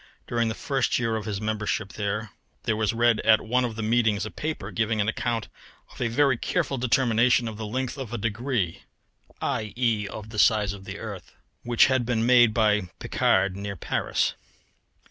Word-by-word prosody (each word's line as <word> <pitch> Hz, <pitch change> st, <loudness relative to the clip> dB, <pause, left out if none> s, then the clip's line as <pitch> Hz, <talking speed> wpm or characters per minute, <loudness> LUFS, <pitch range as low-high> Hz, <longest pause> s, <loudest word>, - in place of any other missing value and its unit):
During 115 Hz, -1 st, 0 dB
the 110 Hz, -, -2 dB
first 135 Hz, +1 st, 0 dB
year 115 Hz, -2 st, 0 dB
of 110 Hz, -2 st, -4 dB
his 105 Hz, -3 st, -3 dB
membership 105 Hz, -1 st, -2 dB
there 105 Hz, +1 st, -3 dB, 0.4 s
was 110 Hz, -1 st, +1 dB
read 120 Hz, -1 st, +3 dB
at 110 Hz, -1 st, +5 dB
one 125 Hz, +3 st, +2 dB
of 120 Hz, -3 st, -3 dB
the 110 Hz, -, -4 dB
meetings 110 Hz, -3 st, +2 dB
a 110 Hz, -, -6 dB
paper 150 Hz, -10 st, -4 dB
giving 110 Hz, +2 st, 0 dB
an 105 Hz, -, +1 dB
account 115 Hz, 0 st, -1 dB, 0.5 s
of -, -, -11 dB
a 120 Hz, -, +2 dB
very 130 Hz, +2 st, +2 dB
careful 135 Hz, +3 st, -1 dB
determination 120 Hz, -1 st, +3 dB
of 110 Hz, -2 st, -6 dB
the 110 Hz, -1 st, -5 dB
length 130 Hz, +4 st, -3 dB
of 125 Hz, -4 st, -6 dB
a 120 Hz, -, -2 dB
degree 115 Hz, -3 st, -2 dB, 0.6 s
(i.e. 110 Hz, -1 st, -1 dB
of 110 Hz, +2 st, -8 dB
the 105 Hz, -, -4 dB
size 105 Hz, -3 st, +4 dB
of 100 Hz, -1 st, -11 dB
the 95 Hz, +1 st, -6 dB
earth), 100 Hz, -5 st, -8 dB, 0.3 s
which 120 Hz, -1 st, +4 dB
had 130 Hz, -2 st, +2 dB
been 115 Hz, -1 st, 0 dB
made 120 Hz, -2 st, +6 dB
by 105 Hz, -4 st, +2 dB
Picard 95 Hz, 0 st, +1 dB
near 100 Hz, 0 st, -5 dB
Paris. -, -, -1 dB
110 Hz, 185 wpm, -26 LUFS, 105-120 Hz, 0.6 s, made